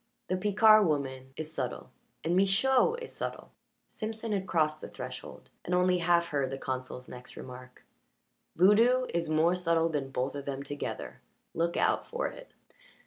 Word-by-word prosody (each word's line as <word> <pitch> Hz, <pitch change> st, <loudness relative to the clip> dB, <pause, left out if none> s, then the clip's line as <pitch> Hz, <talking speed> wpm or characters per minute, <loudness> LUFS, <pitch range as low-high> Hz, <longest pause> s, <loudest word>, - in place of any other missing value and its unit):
The 185 Hz, -, +1 dB
Picard 210 Hz, +1 st, +5 dB
woman 130 Hz, -3 st, -2 dB
is 155 Hz, 0 st, -4 dB
subtle, -, -, -4 dB, 0.3 s
and 170 Hz, +2 st, +1 dB
Michaud 225 Hz, -, +3 dB
is -, -, -8 dB
subtle." -, -, -5 dB, 0.4 s
Simpson 220 Hz, +1 st, -5 dB
had 195 Hz, -2 st, -1 dB
crossed 155 Hz, -2 st, +1 dB
the -, -, -7 dB
threshold, 125 Hz, -1 st, -9 dB
and 180 Hz, -, 0 dB
only 180 Hz, 0 st, +3 dB
half 170 Hz, 0 st, +3 dB
heard 140 Hz, -3 st, 0 dB
the 135 Hz, -, -4 dB
consul's 130 Hz, -1 st, -5 dB
next 125 Hz, 0 st, -11 dB
remark. 125 Hz, 0 st, -10 dB, 0.7 s
"Voodoo 230 Hz, +8 st, +5 dB
is 170 Hz, -2 st, -1 dB
more 160 Hz, +3 st, +3 dB
subtle 165 Hz, -2 st, +1 dB
than 145 Hz, -4 st, -2 dB
both 130 Hz, 0 st, -2 dB
of 140 Hz, -1 st, -6 dB
them 140 Hz, 0 st, -4 dB
together. 145 Hz, +1 st, -6 dB, 0.3 s
Look 170 Hz, +1 st, 0 dB
out -, -, +1 dB
for 475 Hz, +1 st, -3 dB
it." -, -, -13 dB
165 Hz, 160 wpm, -30 LUFS, 140-195 Hz, 0.7 s, Picard